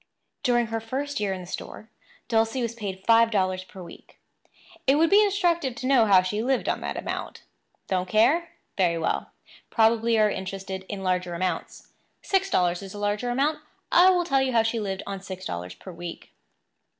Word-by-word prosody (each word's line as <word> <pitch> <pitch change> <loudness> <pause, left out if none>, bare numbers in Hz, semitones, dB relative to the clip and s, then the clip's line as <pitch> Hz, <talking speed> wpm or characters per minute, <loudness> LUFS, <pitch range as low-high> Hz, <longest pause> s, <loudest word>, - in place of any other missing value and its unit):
During 240 -3 +2
her 225 - 0
first 275 +6 -4
year 205 -2 -1
in 185 -1 -4
the - - -9
store, 215 +4 -8 0.4
Dulcie 225 +2 +1
was 230 -1 -2
paid 195 -5 -6
five 230 0 +5
dollars 185 -3 0
per 185 0 -11
week. 170 - -14 0.7
It 270 - +5
would 325 +3 +3
be 410 +1 +7
instructive 345 - +1
to 255 - -6
know 255 -4 +4
how 190 -2 +6
she 210 +4 -2
lived 260 +2 0
on - - -1
that - - -4
amount. - - -5 0.4
Don't 185 -1 -1
care? 300 - +3 0.3
Very 175 -3 +2
well; 165 - -1 0.4
probably 230 0 +3
you 220 - +4
are 210 -1 +4
interested 190 0 -5
in 195 -2 -5
larger 180 -1 -1
amounts. 185 +1 -4 0.3
Six 390 0 +1
dollars 180 - +1
is 195 0 -9
a - - -6
larger 205 +4 -1
amount. 280 +5 +1 0.3
I 360 +2 +7
will 355 -2 +2
tell 275 -4 +2
you 260 -1 0
how 225 -1 +4
she 225 +1 -1
lived 195 -3 -3
on 195 -1 -5
six 185 -1 -8
dollars 90 - -5
per 185 - -11
week. 175 0 -9
215 Hz, 195 wpm, -25 LUFS, 190-260 Hz, 0.7 s, be